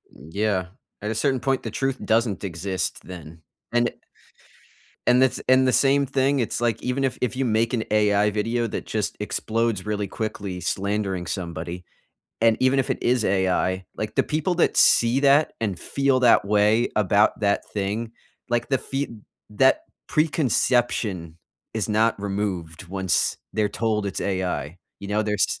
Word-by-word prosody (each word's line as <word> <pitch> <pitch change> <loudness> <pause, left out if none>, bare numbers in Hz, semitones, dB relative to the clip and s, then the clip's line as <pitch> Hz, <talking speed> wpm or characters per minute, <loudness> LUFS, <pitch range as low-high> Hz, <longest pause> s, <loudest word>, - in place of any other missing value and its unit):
Mm, 70 +6 -13
yeah, 100 -2 0 0.3
at 105 +1 -2
a - - -3
certain 135 +3 +1
point, 135 +1 0
the - - -5
truth 135 -1 -1
doesn't 110 -3 +1
exist 95 +1 -3
then, 80 -2 -10 0.3
and 120 0 +3
it - - -9 1.1
and 125 +1 +5
the 130 -1 +1
and 130 0 +5
the 130 - +2
same 140 0 +3
thing, 135 +1 +1
it's 120 0 -2
like, 115 -2 0
even 125 +2 -1
if 135 -2 -1
if 125 0 -1
you 135 +1 0
make 115 +1 +1
an 115 -3 0
AI 105 -1 +3
video 115 +3 -1
that - - -5
just 105 -2 -2
explodes 110 -1 -1
really 105 -1 -2
quickly, 100 -3 -4
slandering 95 0 -2
somebody, 85 0 -5 0.6
and 115 -1 +4
even 130 +1 +3
if 135 - 0
it - - 0
is 120 -2 +2
AI, 95 -1 +1
like, 105 0 -4
the - - +5
people 155 +4 -1
that 175 - +2
see 120 +3 +5
that, 140 +2 +4
and 100 -6 -2
feel 135 +5 +1
that 120 -5 +5
way 105 +3 +3
about 105 +1 +3
that 100 -1 +1
thing, 105 +3 -2 0.4
like, 120 -1 0
the 135 - +2
fee 135 +3 -3 0.4
that 130 - +3 0.3
preconception 120 - 0 0.3
is 110 -1 -2
not 110 0 +2
removed 95 -4 -3
once 95 0 0 0.2
they're 105 -1 +1
told 105 -1 -1
it's 100 - -4
AI. 90 -4 -2 0.2
You 100 - -7
know, 105 +1 +1
there's 105 -1 0
110 Hz, 165 wpm, -24 LUFS, 100-125 Hz, 1.1 s, and